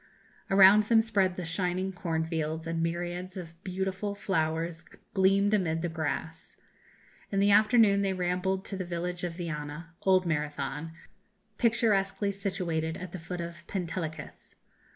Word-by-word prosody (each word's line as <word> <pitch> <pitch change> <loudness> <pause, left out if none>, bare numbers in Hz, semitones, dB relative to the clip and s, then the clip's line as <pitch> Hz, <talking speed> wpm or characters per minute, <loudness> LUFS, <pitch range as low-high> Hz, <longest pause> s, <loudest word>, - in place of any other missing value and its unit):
Around 195 +2 +7
them 225 +1 +5
spread 200 -5 +1
the 180 - -4
shining 180 +3 -1
corn 165 -3 -2
fields, 160 0 -3
and 165 0 -2
myriads 175 +2 -3
of 170 -3 -7
beautiful 190 +2 -3
flowers 165 -3 -1 0.3
gleamed 195 +1 +3
amid 165 -5 +1
the 175 - 0
grass. 160 0 -4 0.7
In 195 - +1
the 200 +1 +4
afternoon 215 -1 +5
they 195 -1 +1
rambled 185 +1 -1
to 195 - -4
the 185 - -2
village 175 0 -4
of 175 -1 -3
Viana 165 -1 -5
old 185 -1 +4
Marathon 150 -1 -2 0.7
picturesquely 205 -4 +2
situated 180 -5 -2
at 185 -2 -7
the 185 - -6
foot 170 +2 -5
of 170 0 -6
Pentelicus. 165 -5 -5
180 Hz, 140 wpm, -29 LUFS, 165-195 Hz, 0.7 s, Around